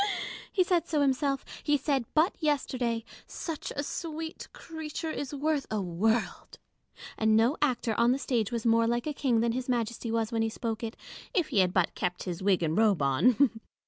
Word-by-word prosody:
He 375 - +3
said 355 -3 +1
so 305 -3 +1
himself: 275 0 +1 0.2
he 295 0 +3
said 275 -3 0
but 320 +5 +4
yesterday 255 -6 0
— - - -15
" - - -31 0.2
Such 325 -3 -4
a 285 - -1
sweet 320 +1 -5
creature 320 0 -6
is 285 -3 -4
worth 295 0 -1
a 215 - -1
world 205 +5 -1 0.3
:" - - -15
and 220 0 +4
no 235 +6 +3
actor 250 -5 +1
on 235 +1 +5
the 260 - +2
stage 240 -5 -1
was 235 -1 -3
more 230 0 +4
like 240 +1 0
a 305 - -2
king 250 -5 +1
than 235 0 +2
His 255 +2 -3
Majesty 235 -1 -1
was 225 0 0
when 225 -1 0
he 225 - +1
spoke 225 0 -4
it, 225 0 -5 0.4
if 350 -5 +2
he 205 - +2
had 185 -1 +4
but 185 -2 +1
kept 180 0 -2
his 180 0 -4
wig 190 -2 +2
and 160 0 0
robe 210 -7 +3
on. 225 - +4
240 Hz, 210 wpm, -29 LUFS, 220-290 Hz, 0.4 s, on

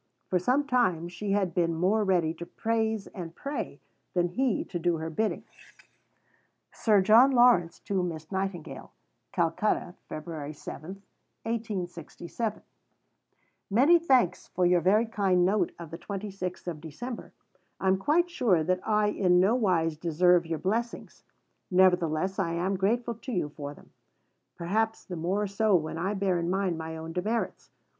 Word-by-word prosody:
For 180 - +3
some 255 +10 +1
time 185 - +1
she 200 +3 -3
had 195 -4 +1
been 170 -1 +1
more 195 +6 +2
ready 175 -5 +2
to 170 - -8
praise 220 +1 -1
and 170 -4 -8
pray 280 +1 -5 0.4
than 175 -1 +2
he 250 +4 0
to 175 - -5
do 170 0 +1
her 160 +1 -5
bidding: 215 +7 -1 1.3
(Sir 210 -3 +3
John 225 +7 +7
Lawrence 240 -10 +4
to 195 -2 -1
Miss 160 -2 -5
Nightingale.) 190 -4 -4 0.4
CALCUTTA, 170 +2 0 0.2
Feb. 155 -2 -6
7. 185 +7 -9 2.7
Many 275 - +5
thanks 255 - +2
for 180 - 0
your 175 0 +4
very 210 +7 +4
kind 195 -5 +2
note 200 +3 +1
of 170 -3 -9
the 165 - -7
26th 195 -2 -5
of 160 -4 -4
December. 225 - -7 0.5
I 190 - -1
am 190 0 +4
quite 315 - +2
sure 210 - +2
that 185 +3 +1
I 215 -1 +2
in 180 -3 +3
no 195 +5 +4
wise 175 -9 +1
deserve 175 +1 +3
your 165 -1 -2
blessings; 225 +8 -3 0.5
nevertheless 180 -1 +2
I 170 -3 0
am 180 +3 0
grateful 235 +5 0
to 230 +3 -8
you 175 -9 -1
for 145 0 -7
them, - - -19 0.6
perhaps 220 +6 -1
the 180 - -6
more 185 +6 -1
so 205 +1 +2
when 160 -1 -1
I 195 +4 -1
bear 190 -3 +1
in 170 0 -2
mind 185 -3 0
my 160 0 -5
own 160 +1 -7
demerits. 215 +7 -2
185 Hz, 150 wpm, -28 LUFS, 170-215 Hz, 2.7 s, John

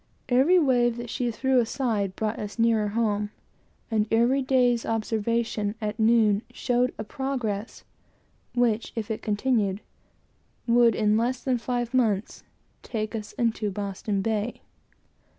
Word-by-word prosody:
Every 270 +9 +5
wave 245 -7 +3
that 240 -1 -6
she 245 -1 -1
threw 255 +3 +2
aside 220 -5 -1
brought 215 0 -2
us 205 -1 -6
nearer 225 -2 +3
home, 210 -1 0 0.6
and 215 -1 +1
every 240 +4 +3
day's 250 -3 +2
observation 225 -1 -1
at 215 0 -4
noon 220 -2 +4
showed 250 0 0
a - - -4
progress 235 -4 -4 0.7
which, 235 -2 +1
if 225 -1 -3
it 220 - -3
continued, 210 -2 0 0.9
would 235 -2 +4
in 215 -1 +2
less 245 +3 -1
than 255 -2 +1
five 240 0 -2
months, 220 -6 0 0.4
take 215 -2 -4
us 215 -2 -5
into 225 -3 0
Boston 200 0 -3
Bay. 220 +1 -2
225 Hz, 135 wpm, -26 LUFS, 210-245 Hz, 0.9 s, Every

